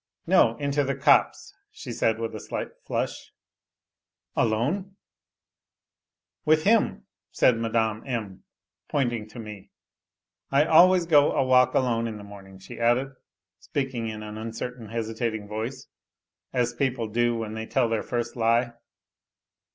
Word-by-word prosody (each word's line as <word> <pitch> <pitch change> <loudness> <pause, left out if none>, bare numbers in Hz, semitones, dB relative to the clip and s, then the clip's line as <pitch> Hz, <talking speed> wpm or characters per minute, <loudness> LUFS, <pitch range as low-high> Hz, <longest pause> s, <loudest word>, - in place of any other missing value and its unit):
" - - -55
No, 115 - +4
into 145 0 0
the 135 0 -1
copse," 135 - +2 0.2
she - - -9
said, 110 0 +1
with 115 -1 -4
a 110 - -6
slight - - -5 0.2
flush. - - -3 0.5
" - - -58
Alone? 150 - 0 0.5
" - - -65
" - - -65
With 155 0 +3
him," 220 +3 +2 0.2
said 125 - +3
Mme. 110 -1 0
M., 110 -7 -4 0.5
pointing 120 -6 -1
to 110 - -14
me. 105 -4 -9 0.4
" - - -65
I 140 +2 +4
always 175 +2 +6
go 150 -3 +5
a 135 - +1
walk 130 0 +4
alone 115 -3 +1
in 110 -2 -6
the 105 - -10
morning," 100 -2 -12
she 115 +5 -11
added, 120 +3 +2 0.5
speaking 135 -6 -3
in 110 -1 -6
an 105 0 -7
uncertain, 115 +1 -6
hesitating 110 -1 -3
voice, 110 +5 -5 0.7
as 120 -1 0
people 130 -5 -1
do 120 +2 +1
when 110 -1 -4
they 110 0 -5
tell 130 -3 +2
their 115 -2 -1
first 120 -1 -3
lie. 120 +1 +2
115 Hz, 150 wpm, -26 LUFS, 110-135 Hz, 0.7 s, always